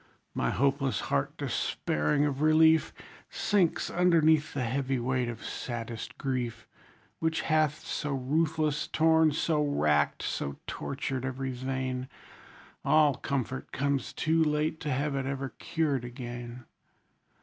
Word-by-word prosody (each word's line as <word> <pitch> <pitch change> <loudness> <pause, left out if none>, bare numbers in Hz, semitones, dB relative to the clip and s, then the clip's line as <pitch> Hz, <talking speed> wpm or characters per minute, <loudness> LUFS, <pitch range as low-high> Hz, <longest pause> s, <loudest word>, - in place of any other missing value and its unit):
My - - 0
hopeless 135 0 +1
heart, 70 0 -1
despairing 75 - 0
of 140 -1 -2
relief, 160 +1 +5 0.4
Sinks 200 -6 +1
underneath 160 -4 +3
the 130 - 0
heavy 130 +2 -1
weight 125 0 0
of 115 -1 -7
saddest 115 0 -5
grief; 125 -5 -3 0.5
Which 160 0 0
hath 155 -2 +1
so 145 - -3
ruthless 150 +3 0
torn, 160 0 +4
so 150 0 +1
racked, 75 - +1
so 70 -1 -3
tortured 135 -2 -4
every 130 0 -3
vein, 130 0 -3 0.7
All 150 0 +5
comfort 130 -1 -3
comes 140 -1 -1
too 160 +1 +2
late 155 +1 0
to 150 - -3
have 140 +3 0
it 135 -1 -2
ever 135 0 -3
cured 150 -6 0
again. 120 0 -7
140 Hz, 125 wpm, -29 LUFS, 125-155 Hz, 0.7 s, relief